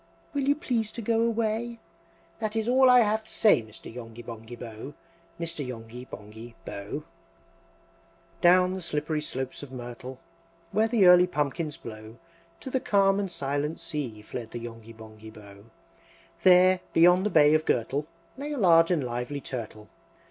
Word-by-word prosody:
Will 280 -1 0
you 285 - +4
please 240 -9 -2
to 235 - -6
go 225 +1 +1
away? 230 0 -1 0.6
That 215 0 -3
is 220 0 -1
all 260 +1 +5
I 250 -1 +7
have 220 0 +1
to - - -19
say, 210 - +4
Mr. 110 0 -11
Yongby 120 -1 -9
Bonghy 115 +1 -9
Bò! 115 +4 -9 0.4
Mr. 165 -3 -3
Yonghy 120 -1 -8
Bonghy 110 +3 -11
Bò!" 100 0 -7
VIII. 150 - -4 1.4
Down 180 +1 +5
the 190 - -5
slippery 150 -1 -2
slopes 130 -3 -5
of 145 -2 -10
Myrtle, 125 +1 -8 0.5
Where 215 +3 +2
the 225 -4 +3
early 180 0 +8
pumpkins 150 -1 -2
blow, 110 0 -10 0.4
To 260 - -7
the 260 - +1
calm 195 -3 +3
and 200 -1 -2
silent 145 0 -2
sea 120 -8 -5
Fled 115 0 -7
the 120 - -6
Yonghy 115 -1 -9
Bonghy 110 0 -12
Bò. 100 -1 -14 0.8
There, 185 0 +6
beyond 180 +2 +6
the 210 - +1
Bay 150 -4 +5
of 155 0 +2
Gurtle, 135 +5 0 0.3
Lay 290 +2 -4
a - - -4
large 165 -6 +5
and 170 -6 +1
lively 125 +3 -4
Turtle. 110 -5 -7
150 Hz, 165 wpm, -27 LUFS, -, 1.4 s, early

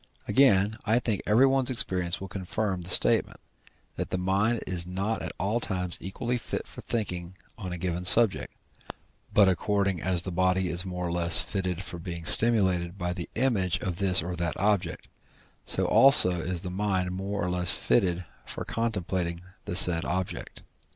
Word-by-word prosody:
Again, 110 -6 +3
I 110 +2 +1
think 115 -4 -2
everyone's 130 +4 +3
experience 90 -8 -2
will 95 - -7
confirm 95 +1 -4
the 85 - -9
statement, - - +2 0.6
that - - -4
the - - -2
mind 100 +5 0
is 90 -2 -2
not 95 +5 -3
at - - -4
all 100 +5 -1
times 90 -5 -4
equally 120 +6 -4
fit - - -5
for - - -11
thinking 90 -5 -4 0.2
on 95 -5 -7
a 90 - -5
given 90 0 -3
subject, 110 +3 +5 0.8
but 100 -2 +5
according 95 -1 0
as 90 -1 -1
the 95 - -5
body 95 +1 0
is 85 +3 -1
more 90 -1 -5
or 85 - -3
less 85 -1 +4
fitted 95 -2 -4
for 90 -1 -8
being 85 -1 -7
stimulated 95 -5 +2
by 90 -2 -3
the 90 -2 -7
image 100 -7 0
of 90 -3 -4
this 95 -3 +2
or 90 +1 -5
that 85 -2 -2
object, 100 -3 -1 0.6
so - - 0
also 90 - +7
is 90 +1 -4
the 90 - -5
mind 95 -2 -2
more 100 +2 -5
or 90 - -2
less 90 -1 +2
fitted 90 -5 0 0.2
for - - -7
contemplating 95 -6 -3 0.2
the 90 - -4
said 90 -3 +6
object. 95 +1 -5
95 Hz, 170 wpm, -26 LUFS, 90-105 Hz, 0.8 s, also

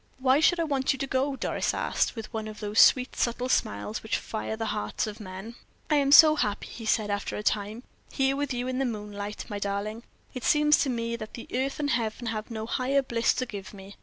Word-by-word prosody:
"Why 260 +1 +3
should 340 +2 +4
I - - +2
want 275 -4 +1
you - - -6
to 275 - -2
go?" 270 +1 0
Doris - - -1
asked, - - 0
with 225 0 -8
one 220 -1 -3
of 215 -1 -8
those 210 0 -1
sweet, 255 0 +5
subtle 245 +1 -1
smiles 105 - -1
which 220 - -1
fire 220 0 -4
the 225 0 -3
hearts 210 - -2
of 215 0 -7
men. 195 +2 -8 0.4
"I 300 - +5
am 280 -1 +2
so 310 +1 +9
happy," 205 -7 -1
he 225 -2 -8
said, 215 -2 +1
after 205 0 -2
a 210 - -5
time, 215 +3 -1 0.3
"here 270 0 +1
with 285 -1 -2
you 245 0 -2
in 255 0 -2
the 270 - +1
moonlight, 210 -2 -5
my 205 - -5
darling; 200 +3 -3 0.3
it 255 - -6
seems 300 0 +4
to 280 - +1
me 230 -1 -2
that 215 0 -8 0.2
earth 270 +3 -1
and 290 -1 0
heaven 230 -1 -1
have 215 0 -4
no 220 -1 -4
higher 265 +4 +1
bliss 235 -2 +1
to 255 - -1
give 205 -3 -8
me. 195 +1 -11
230 Hz, 230 wpm, -27 LUFS, 210-265 Hz, 0.4 s, so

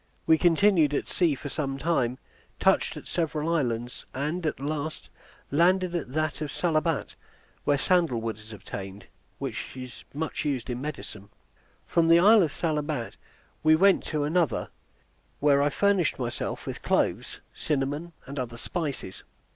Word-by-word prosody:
We 160 -1 +5
continued 170 -4 +4
at - - -1
sea 170 -6 +2
for 145 - -7
some 135 -1 -2
time, 135 -5 0 0.4
touched - - +2
at - - -9
several 160 -1 -1
islands, 120 -5 -1
and 150 +7 -2
at 150 - -2
last 150 +2 -4 0.4
landed 180 +4 +3
at 150 -7 -3
that 155 0 -1
of 150 - -3
Salabat, 160 -4 0 0.5
where 145 - +3
sandal 165 -5 +2
wood 110 -2 -4
is 105 +1 -13
obtained, 100 -1 -8 0.3
which - - -5
is 130 -1 -8
much 155 +2 -3
used 135 -4 -2
in 125 +1 -4
medicine. 110 -8 -7 0.6
From 165 -1 +2
the 165 +1 +7
isle 210 +5 +7
of 160 -5 +1
Salabat 150 -6 -2 0.5
we 155 0 +6
went 195 +4 +5
to 150 -2 -1
another, 155 -4 +1 0.7
where 140 -1 +4
I 145 - +3
furnished 195 -3 +2
myself 120 -2 -3
with - - -5
cloves, - - 0
cinnamon, 150 +3 -2
and 140 +1 -6
other 120 -2 -4
spices. 140 - -4
150 Hz, 150 wpm, -27 LUFS, 130-165 Hz, 0.7 s, the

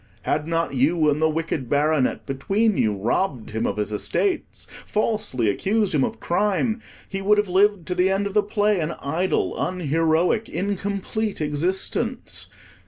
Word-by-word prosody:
Had 150 +1 -1
not 165 -2 0
you 150 +4 +3
and 150 +2 -1
the 160 - +4
Wicked 155 -5 -2
Baronet 145 -1 +1
between 195 +11 +1
you 110 - +2
robbed 120 - -1
him 110 +1 -1
of - - -2
his 105 0 -2
estates, 360 - -1 0.2
falsely 210 - -1
accused 200 - +1
him 145 -3 +3
of - - -2
crime, 210 +5 0 0.3
he 195 0 -4
would 210 +2 +4
have 210 0 +2
lived 195 -1 +3
to 180 - -1
the 180 +1 +2
end 195 +1 +1
of 200 - -3
the 210 - +4
play 205 -1 +1
an 165 +1 -2
idle, 165 +7 0
unheroic, 165 +4 +1
incomplete 200 +2 -2
existence. 185 - -2
180 Hz, 160 wpm, -23 LUFS, 150-205 Hz, 0.3 s, the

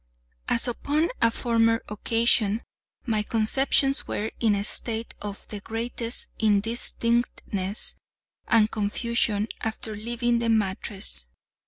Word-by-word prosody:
As 235 - +5
upon 295 +7 0
a 230 - +6
former 230 -1 +2
occasion 225 0 +1 0.4
my 220 -4 +1
conceptions 270 +5 +2
were 215 +2 -2
in 220 -3 +3
a 200 - -1
state 225 +2 0
of 205 -1 -7
the 210 - -5
greatest 230 +2 -2
indistinctness 220 -2 0 0.5
and 220 -1 +4
confusion 210 0 0
after 220 0 -4
leaving 235 +2 0
the 235 0 0
mattress. 195 - -1
225 Hz, 110 wpm, -26 LUFS, 210-235 Hz, 0.5 s, a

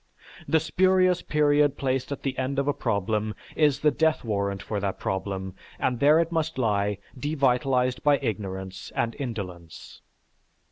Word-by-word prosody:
The 160 - +4
spurious 185 +2 +3
period 145 -2 +2
placed 130 0 -1
at 140 - -5
the 135 -2 -2
end 130 +1 -2
of 140 0 0
a 145 - +2
problem 105 0 -1 0.2
is 150 -3 +3
the 150 - +4
death 160 +2 +1
warrant 100 -3 -2
for 105 - -3
that 100 -1 -2
problem 95 0 -3 0.2
and 125 -2 -1
there 150 +3 +6
it 165 0 0
must 160 -2 -1
lie 105 -4 +1 0.2
devitalized 130 -2 +1
by 145 -1 +4
ignorance 95 -6 -5
and 115 0 -1
indolence. 90 - -7
130 Hz, 150 wpm, -26 LUFS, 100-150 Hz, 0.2 s, there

